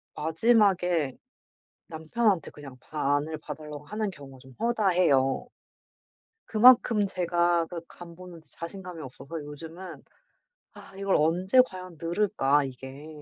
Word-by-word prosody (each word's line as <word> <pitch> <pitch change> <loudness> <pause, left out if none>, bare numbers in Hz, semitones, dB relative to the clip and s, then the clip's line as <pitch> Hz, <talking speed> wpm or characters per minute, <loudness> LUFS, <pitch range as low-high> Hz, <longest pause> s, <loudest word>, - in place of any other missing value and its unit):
마지막에 175 - +2 0.7
남편한테 165 +3 0
그냥 135 -3 -12
반을 150 +2 -1
봐 - - -7
달라고 150 -1 -10
하는 210 +2 -3
경우가 135 -6 -12
좀 130 0 -16
허다해요. 180 - +2 1.0
그만큼 225 -2 +6
제가 175 -2 +1
그 170 -1 -6
간 170 -1 -12
보는데 170 -3 -12
자신감이 175 0 -8
없어서 140 +4 -8
요즘은 165 +5 -9 0.7
'아. - - -14
이걸 195 -1 +1
언제 180 +10 +4
과연 185 -4 -10
늘까 165 -6 +1
이게? 135 +3 -9
170 Hz, 260 characters per minute, -27 LUFS, 150-190 Hz, 1.0 s, 그만큼